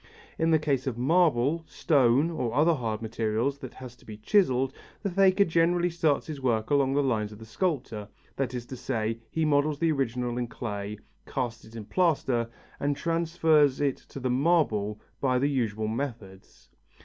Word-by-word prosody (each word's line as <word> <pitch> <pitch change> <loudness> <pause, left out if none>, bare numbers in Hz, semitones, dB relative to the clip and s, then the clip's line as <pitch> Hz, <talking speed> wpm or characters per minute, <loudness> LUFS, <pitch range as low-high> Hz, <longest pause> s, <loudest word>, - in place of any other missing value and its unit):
In 160 0 +2
the 160 - +5
case 140 -3 -1
of 125 -3 -2
marble, 155 +1 +2
stone 140 +1 +3
or 125 -7 -2
other 160 +4 +4
hard 115 -6 -3
material 110 +3 0
that 135 -3 -10
has 125 -2 -10
to - - -22
be 105 -1 -9
chiselled, 130 - +2 0.3
the 200 - -1
faker 195 +1 +4
generally 170 +1 +2
starts 160 -4 +1
his 150 -3 -7
work 115 -1 0
along 140 -1 +3
the 145 - +3
lines 110 -5 0
of 105 - -10
the 110 - -11
sculptor, 115 - -2 0.3
that 130 -2 -2
is 120 -1 -4
to 130 - -8
say, 115 -2 -2
he 160 +5 0
models 145 0 +2
the 165 +1 +2
original 125 -3 -1
in 120 - -2
clay, 105 -3 -5 0.3
casts 120 -3 -3
it 110 +1 -15
in 110 -2 -7
plaster 135 - +1 0.3
and 145 0 0
transfers 165 -4 +2
it 140 -2 +1
to - - -11
the 130 -1 -1
marble 125 -8 +1 0.2
by 130 -2 +2
the 140 +3 +1
usual 110 -5 -1
methods. 110 -6 -6
130 Hz, 180 wpm, -27 LUFS, 115-155 Hz, 0.3 s, the